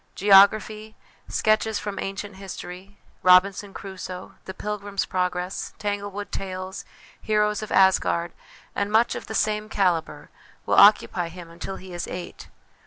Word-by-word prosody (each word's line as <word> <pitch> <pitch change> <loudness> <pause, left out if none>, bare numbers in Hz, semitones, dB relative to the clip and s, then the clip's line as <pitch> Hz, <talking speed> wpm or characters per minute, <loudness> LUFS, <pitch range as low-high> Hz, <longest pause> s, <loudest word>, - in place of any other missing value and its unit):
Geography, 210 +2 +4 0.3
sketches 215 0 +1
from 205 -1 -5
ancient 195 0 -5
history, 190 0 -9 0.2
Robinson 190 +2 +4
Crusoe? 185 -2 -8
The 190 - -7
Pilgrims 205 -1 -3
Progress? 180 0 -3
Tanglewood 205 -1 -4
Tales? 185 0 -5 0.4
Heroes 210 -1 +1
of 215 - -7
Asgard? 175 -3 +3 0.4
and 200 +1 -1
much 225 +2 +3
of - - -7
the 220 - -5
same 215 0 0
calibre, 180 -6 -1 0.4
will - - -1
occupy 200 -4 +5
him 170 -1 -11
until 175 +3 -6
he 185 -1 -11
is 175 - -4
eight. 180 0 -8
195 Hz, 130 wpm, -24 LUFS, 185-210 Hz, 0.4 s, occupy